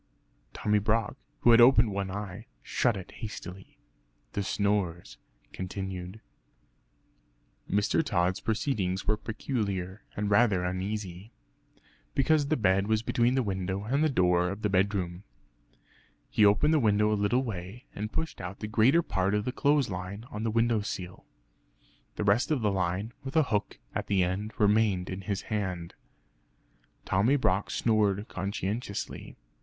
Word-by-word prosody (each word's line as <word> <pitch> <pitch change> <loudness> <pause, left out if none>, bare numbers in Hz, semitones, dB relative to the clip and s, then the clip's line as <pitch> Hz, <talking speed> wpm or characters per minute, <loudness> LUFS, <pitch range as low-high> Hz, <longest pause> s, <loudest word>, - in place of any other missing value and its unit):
Tommy 105 0 +1
Brock, 110 +3 0 0.3
who 120 - +6
had 115 0 +8
opened 120 -3 +6
one 100 -1 -2
eye 100 +2 -6 0.2
shut 120 -5 +1
it 95 - -9
hastily. 95 -4 -8 0.6
The 100 - -1
snores 95 - -1 0.3
continued. 95 +1 -5 1.5
Mr. 105 +10 +2
Tod's 90 - 0
proceedings 105 -5 -1
were 110 - +2
peculiar, 105 -4 -3 0.2
and 105 0 -1
rather 100 -4 +4
uneasy, 95 +2 -4 0.8
(because 145 +1 +3
the 155 +2 +1
bed 95 -2 +2
was 110 0 +1
between 120 +2 +2
the 130 - +2
window 95 -1 -2
and 135 +8 +1
the 155 - +3
door 90 -7 +2
of 100 +3 -6
the 105 - +1
bedroom). 95 -2 0 1.1
He 105 - +3
opened 105 +10 +5
the 155 - +4
window 105 -3 +3
a - - +3
little 105 +5 +1
way, 105 +2 -6
and 105 +2 -4
pushed 160 - -3
out 90 +2 -6
the - - -4
greater 120 +10 +4
part 95 -3 0
of 105 +1 -1
the 125 - -1
clothes 140 -3 +2
line 95 +4 -6
on 105 - -5
to - - -2
the - - +1
window 115 -1 +2
sill. 90 -3 -6 0.9
The - - -2
rest 105 +8 +3
of 150 -5 +1
the 105 -2 +2
line, 95 +4 -1
with 135 +2 -6
a 160 - +5
hook 105 - -1 0.2
at - - -3
the 95 -2 +3
end, 95 +5 -2
remained 105 -3 +2
in 95 +1 -5
his 100 0 -3
hand. 90 -5 -3 1.1
Tommy 105 +9 +3
Brock 100 -7 +1
snored 105 -2 +1
conscientiously. 100 +2 -4
105 Hz, 150 wpm, -29 LUFS, 95-115 Hz, 1.5 s, had